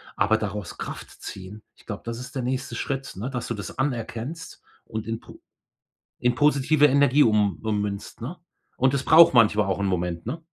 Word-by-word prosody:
aber 105 Hz, +3 st, +3 dB
daraus 105 Hz, -4 st, -5 dB
Kraft -, -, -7 dB
ziehen. 95 Hz, +3 st, -8 dB
Ich -, -, -22 dB
glaube, 105 Hz, -2 st, -6 dB
das 115 Hz, 0 st, -4 dB
ist 125 Hz, +3 st, -10 dB
der 130 Hz, -, -1 dB
nächste 130 Hz, +2 st, -3 dB
Schritt, 135 Hz, -5 st, -4 dB
ne, 110 Hz, +7 st, -3 dB
dass 125 Hz, -3 st, -4 dB
du -, -, 0 dB
das 100 Hz, -3 st, -7 dB
anerkennst 130 Hz, +3 st, -4 dB, 0.2 s
und 110 Hz, 0 st, -6 dB
in 115 Hz, 0 st, -3 dB
po -, -, -15 dB, 0.8 s
in 125 Hz, 0 st, +2 dB
positive 145 Hz, +1 st, +4 dB
Energie 140 Hz, 0 st, +5 dB
um 105 Hz, -6 st, +2 dB
ummünzt, 105 Hz, -2 st, -3 dB
ne? 145 Hz, +10 st, -6 dB, 0.4 s
Und 130 Hz, +1 st, +3 dB
das 140 Hz, -1 st, 0 dB
braucht 165 Hz, -1 st, +7 dB
manchmal 105 Hz, -3 st, +5 dB
auch 95 Hz, 0 st, -1 dB
'n -, -, 0 dB
Moment, 90 Hz, -3 st, -2 dB
ne? 145 Hz, +9 st, -4 dB
115 Hz, 190 wpm, -25 LUFS, 105-135 Hz, 0.8 s, braucht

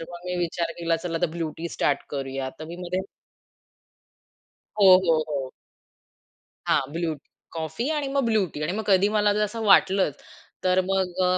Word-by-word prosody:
तर -, -, -5 dB
मग 175 Hz, +1 st, -10 dB
मी 180 Hz, 0 st, -2 dB
विचार 170 Hz, -1 st, -1 dB
केला, 165 Hz, -1 st, +1 dB
चला 165 Hz, 0 st, -3 dB
आता -, -, +2 dB
ब्लू 165 Hz, -2 st, -2 dB
टी 170 Hz, +1 st, -4 dB
स्टार्ट 140 Hz, -3 st, 0 dB
करूया 135 Hz, -1 st, -3 dB
तर 155 Hz, -, -7 dB
मी 170 Hz, +2 st, -8 dB
मध्ये 180 Hz, +1 st, -3 dB, 1.8 s
हो, 190 Hz, -2 st, +9 dB
हो, 160 Hz, -2 st, +3 dB
हो. 135 Hz, -3 st, -3 dB, 1.2 s
हां, -, -, +3 dB
ब्लू 165 Hz, -1 st, -1 dB
टी, 145 Hz, -, -23 dB, 0.2 s
कॉफी 165 Hz, -, -3 dB
आणि 290 Hz, -2 st, -1 dB
मग 275 Hz, -2 st, +1 dB
ब्लू 220 Hz, -4 st, +2 dB
टी 150 Hz, -, -6 dB
आणि -, -, -1 dB
मग 220 Hz, -, -2 dB
कधी 195 Hz, 0 st, +5 dB
मला 210 Hz, -1 st, +3 dB
जर 210 Hz, -, 0 dB
असं 225 Hz, +2 st, -3 dB
वाटलंच, 195 Hz, -5 st, +4 dB, 0.4 s
तर 185 Hz, 0 st, +3 dB
मग 190 Hz, -1 st, 0 dB
अ, 180 Hz, 0 st, +3 dB
175 Hz, 185 wpm, -25 LUFS, 160-195 Hz, 1.8 s, हो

